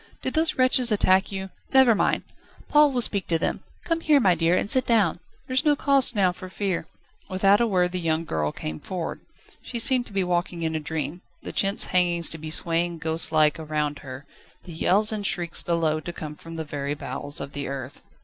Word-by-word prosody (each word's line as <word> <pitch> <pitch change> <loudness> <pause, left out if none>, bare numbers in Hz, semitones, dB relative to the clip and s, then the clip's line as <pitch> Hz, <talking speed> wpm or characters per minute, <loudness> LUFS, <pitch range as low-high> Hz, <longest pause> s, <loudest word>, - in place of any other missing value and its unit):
Did - - -1
those 320 0 +2
wretches 255 -2 +3
attack 190 -2 +3
you? 190 -1 -6 0.2
Never 265 -3 +6
mind. 210 - 0 0.5
Paul 295 0 +5
will 250 -2 +2
speak 200 -4 +1
to 165 - +1
them. 160 - -2 0.2
Come 330 -1 -1
here, 300 -3 +4
my 190 -8 +3
dear, 165 +1 +1
and - - -1
sit 260 +3 +4
down; 225 -7 +1 0.3
there's 255 +2 0
no 300 -2 +3
cause 275 -3 +4
now 190 -3 +3
for 185 +1 -10
fear." 185 -4 -3 0.4
Without 195 +3 +3
a 235 - +2
word 180 -4 +1
the 185 - -2
young 165 -1 -1
girl 75 - -2
came 80 0 -6
forward. 180 -3 -6 0.4
She 240 - -4
seemed 245 +1 +1
now - - -10
to - - -9
be 195 -1 +1
walking 175 -1 -2
in 160 0 -2
a - - -1
dream, 160 +2 -5 0.2
the - - -7
chintz 195 0 +2
hangings 175 -2 +2
to 160 - -5
be 155 +1 -7
swaying 170 +1 +3
ghostlike 160 -1 +1
around 150 -2 -3
her, 130 +1 -10 0.4
the 175 - -10
yells 200 +6 +2
and 215 -1 -4
shrieks 175 -3 -1
below 165 -2 0
to 175 - -7
come 155 -3 -7
from 165 +2 -11
the 160 -1 -4
very 145 -1 -4
bowels 145 0 -4
of 140 0 -7
the 145 -1 -4
earth. 135 -1 -7
175 Hz, 215 wpm, -24 LUFS, 160-210 Hz, 0.5 s, Never